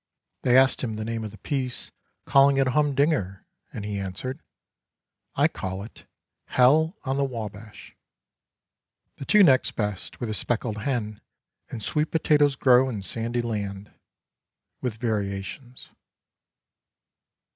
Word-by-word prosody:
They 125 0 +4
asked 130 0 +4
him 110 -3 -2
the 110 0 -4
name 115 0 -3
of 110 - -4
the 105 - -13
piece 130 +3 -3 0.3
calling 140 0 +5
it 135 - +3
a 130 - 0
humdinger 140 - +1 0.3
and 105 - -6
he 105 -1 -3
answered, 100 - -5 0.5
" - - -52
I - - +4
call 95 +1 -5
it 110 - -13 0.2
' - - -58
Hell 155 - +4
On 135 -1 -1
The 140 - +2
Wabash.' 110 -4 -7 0.6
" - - -56
The 135 - -7
two 210 +5 +6
next 135 -7 +4
best 105 -3 -4
were 120 - -2
The 110 - -3
Speckled 110 0 -2
Hen, 110 -3 -3 0.5
and 110 - -6
Sweet 150 +5 0
Potatoes 150 -3 +3
Grow 130 -1 +4
in 105 -6 -5
Sandy 115 +5 -2
Land, 100 -3 -4 0.9
with 125 -4 -2
variations. 110 +3 -4
120 Hz, 145 wpm, -25 LUFS, 105-135 Hz, 0.9 s, two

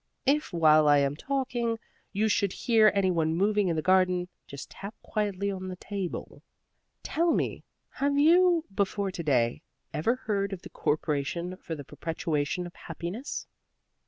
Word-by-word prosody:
If, 295 +3 +2
while 155 -3 +5
I 145 0 +6
am 140 0 +1
talking, 240 - -1 0.3
you 210 +2 +1
should 200 -2 +1
hear 220 -3 +4
any 190 -2 +3
one 160 -2 +1
moving 205 +2 +2
in 170 - +1
the 155 - -1
garden, 185 -1 +3 0.2
just 140 0 -9
tap 200 +3 -8
quietly 200 -2 -1
on 185 -1 -5
the 185 - -5
table. 190 -1 -5 0.6
Tell 335 +1 +1
me, - - -1 0.3
have 280 +1 0
you, 340 +2 +5
before 200 0 0
to 180 - -5
day, 125 -7 +1 0.3
ever 230 +11 +1
heard 200 -5 -2
of 180 - -7
the - - -10
Corporation 155 +3 -1
for 165 -3 -6
the 145 - -8
Perpetuation 160 +2 -2
of 175 - -9
Happiness?" 175 - -6
185 Hz, 160 wpm, -28 LUFS, 165-215 Hz, 0.6 s, I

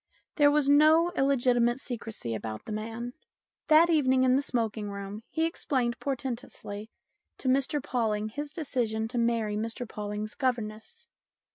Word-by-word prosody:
There 290 -1 +6
was 290 -1 +2
no 310 +4 +6
illegitimate 250 -5 +2
secrecy 225 - -5
about 110 0 -5
the - - -7
man. 225 +3 -4 0.5
That 315 +2 +7
evening 260 -5 +3
in 255 0 +4
the 275 - +3
smoking 225 -6 -2
room 200 +1 -6
he 320 +1 0
explained 255 -7 -1
portentously 240 -5 -5 0.5
to - - -5
Mr 275 +2 +2
Pawling 215 -3 -1
his 290 +6 -5
decision 240 -8 -2
to 245 0 -2
marry 230 -3 +1
Mr 225 +3 -3
Pawling's 210 0 -5
governess. 250 - -3
240 Hz, 140 wpm, -29 LUFS, 215-280 Hz, 0.5 s, That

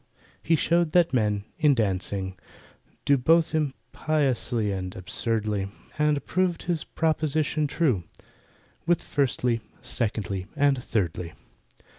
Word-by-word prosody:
He 165 - +3
showed 170 +1 +2
that 175 -4 +4
men, 105 -4 +1
in 150 -3 +5
dancing, 95 -3 -1 0.7
do 140 - +5
Both 165 +6 +3
impiously 135 -6 0
and 95 -1 -4
absurdly, 105 +1 -1 0.3
And 150 -1 +2
proved 185 -2 0
his 170 -3 -1
proposition 155 -1 0
true, 135 - +1 0.8
With 175 -1 +2
Firstly, 125 -4 0 0.2
Secondly, 100 -5 -2
and 140 -3 +2
Thirdly. 90 -5 -2
130 Hz, 105 wpm, -26 LUFS, 105-155 Hz, 0.8 s, in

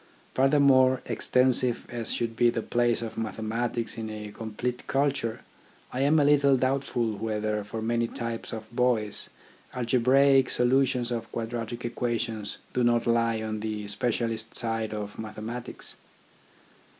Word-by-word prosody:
Furthermore, 130 -1 +5
extensive 125 -1 +1
as 120 -2 -3
should 115 -1 -2
be 120 +1 +4
the 115 -1 -2
place 120 -1 +1
of 115 0 -5
mathematics 115 +2 -2
in 110 -1 -4
a 105 -1 -6
complete 115 +3 -4
culture, 135 -5 0 0.5
I 125 - -2
am 145 +3 +4
a 145 - +4
little 140 -2 +5
doubtful 130 -4 0
whether 105 -1 -1
for 110 +2 -5
many 115 +1 +1
types 115 -1 -4
of 110 +1 -8
boys 120 -4 +2 0.5
algebraic 130 +2 +4
solutions 125 0 +2
of 115 -1 -4
quadratic 115 +1 -4
equations 115 -3 -2 0.2
do 125 - +1
not 120 -1 +3
lie 115 -1 +2
on 110 0 -3
the 105 -1 -4
specialist 115 0 -1
side 115 -2 -1
of 105 -1 -5
mathematics. 110 +2 -6
115 Hz, 135 wpm, -27 LUFS, 110-125 Hz, 0.5 s, Furthermore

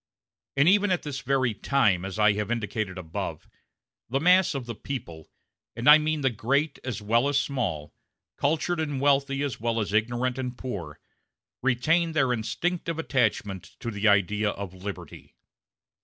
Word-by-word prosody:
And 140 +3 +5
even 205 +2 +4
at 180 -2 0
this 145 -3 -4
very 130 -4 +1
time, 105 -7 +1
as 95 +1 -6
I 105 -1 +5
have 105 0 -3
indicated 110 -4 -2
above, 80 -3 -5 0.6
the 135 +3 0
mass 180 +1 +4
of 135 -3 -4
the 120 - -5
people 95 - -7 0.5
and 120 +4 -3
I 150 +1 +10
mean 155 0 -1
great 140 +7 0
as 120 -5 -4
well 115 +5 +2
as 145 -1 +2
small, 95 - -3 0.4
cultured 160 +4 0
and 145 -4 -2
wealthy 140 0 +2
as 140 -4 -3
well 115 0 -1
as 105 -2 -2
ignorant 120 +4 0
and 125 -1 -4
poor 90 -13 -6 0.6
retain 160 +7 +2
their 135 -5 +2
instinctive 165 +8 -2
attachment 110 - -1
to 115 - -4
the 105 +1 0
idea 105 +1 +3
of 100 -2 -6
liberty. 95 +2 -9
125 Hz, 155 wpm, -26 LUFS, 105-140 Hz, 0.6 s, I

